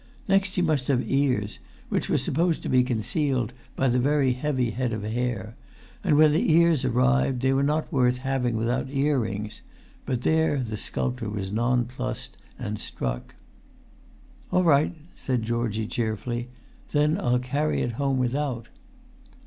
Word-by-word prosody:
Next 195 -1 +2
he 180 - +2
must 150 -6 +1
have 130 -3 +1
ears, 130 -7 +1 0.3
which - - -1
were - - +3
supposed 165 +3 0
to - - -3
be 125 -1 +4
concealed 125 +1 -1 0.2
by 135 - +1
the 125 0 +2
very 135 0 +2
heavy 130 -2 -1
head 125 0 -2
of 110 -2 -3
hair; 115 -1 -2 0.5
and 145 - +3
when 155 0 +7
the 160 +2 +2
ears 165 -4 +4
arrived, 130 0 +2
they 135 0 +3
were 135 - +2
not 150 +4 0
worth 125 -2 +3
having 125 -3 -1
without 120 +4 0
ear 140 0 +1
rings; 105 -1 -4 0.5
but 125 -2 -1
there 160 -2 +2
the 115 -5 -3
sculptor 65 - -3
was 100 -2 -4
nonplussed, 120 +2 -1 0.2
and 105 0 -4
struck. - - -4 1.2
"All 185 - +3
right," 155 +1 +3 0.2
said 125 -4 -1
Georgie, 115 -1 -1
cheerfully; 120 +2 -2 0.5
"then 150 +4 +3
I'll 125 -8 +2
carry 140 +5 0
it 120 - -1
home 135 +3 0
without." 130 -1 -1
125 Hz, 155 wpm, -26 LUFS, 115-145 Hz, 1.2 s, when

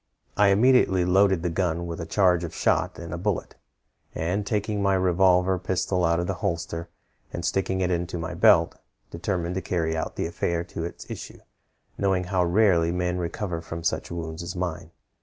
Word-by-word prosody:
"I 105 - +4
immediately 100 -3 +4
loaded 95 -1 +3
the 90 - 0
gun 85 -1 -1
with 85 0 -5
a 85 - -6
charge 90 -3 +3
of 85 -1 -6
shot - - +1
and 85 0 -7
a 85 - -4
bullet, 100 0 -2 0.6
and 95 +5 -1
taking 105 -1 -1
my 100 -1 +3
revolver 90 0 +3
pistol 95 0 -1
out 85 0 +2
of 85 - -1
the 95 - -1
holster, 85 -3 -3 0.4
and 85 - -4
sticking 95 0 0
it 90 0 +1
into 85 0 -2
my 85 +1 -4
belt, 85 - +4 0.3
determined 85 0 -2
to 95 - -2
carry 80 -3 -1
on 80 - -2
the - - -2
affair 85 0 -1
to 85 -2 -6
its 85 - -8
issue, - - -8 0.6
knowing 95 -2 +1
how 90 0 0
rarely 85 -2 +3
men 90 0 -1
recover 85 0 -3
from 85 0 -7
such 85 - -1
wounds 80 -1 -5
as 85 +1 -6
mine. 90 -2 -4
90 Hz, 185 wpm, -25 LUFS, 85-95 Hz, 0.6 s, I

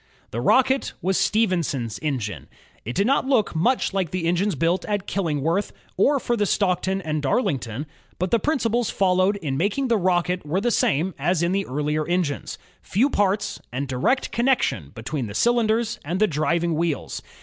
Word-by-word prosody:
The 115 - -3
Rocket 260 - +3
was 190 +2 +1
Stephenson's 170 - 0
engine. 110 - -3 0.4
It 120 - -4
did 200 - +2
not 265 +2 +2
look 240 -10 +2
much 235 +7 +1
like 190 -4 0
the 180 0 -3
engines 180 +3 +1
built 170 +4 +1
at 205 -2 -2
Killingworth 165 0 -1 0.2
or 280 +9 +3
for 240 - -1
the 205 -3 +1
Stockton 190 0 0
and 155 -2 -2
Darlington, 135 - -1 0.3
but 185 +1 -2
the 235 - +4
principles 240 -4 0
followed 185 +1 +2
in 150 -9 -3
making 205 - 0
the 230 - +3
Rocket 180 -1 +1
were 155 +6 -1
the 240 +4 0
same 170 0 +1
as 175 -1 +1
in 170 - +1
the 195 +1 -1
earlier 150 +3 -1
engines: 175 -5 -1 0.2
few 250 +9 +1
parts, 200 0 0
and 135 +3 -3
direct 130 - 0
connection 235 - +1
between 125 +2 -4
the 100 - -8
cylinders 230 - +1
and 170 +5 -2
the 215 - +5
driving 170 0 0
wheels. 160 -2 -2
180 Hz, 170 wpm, -23 LUFS, 150-210 Hz, 0.4 s, the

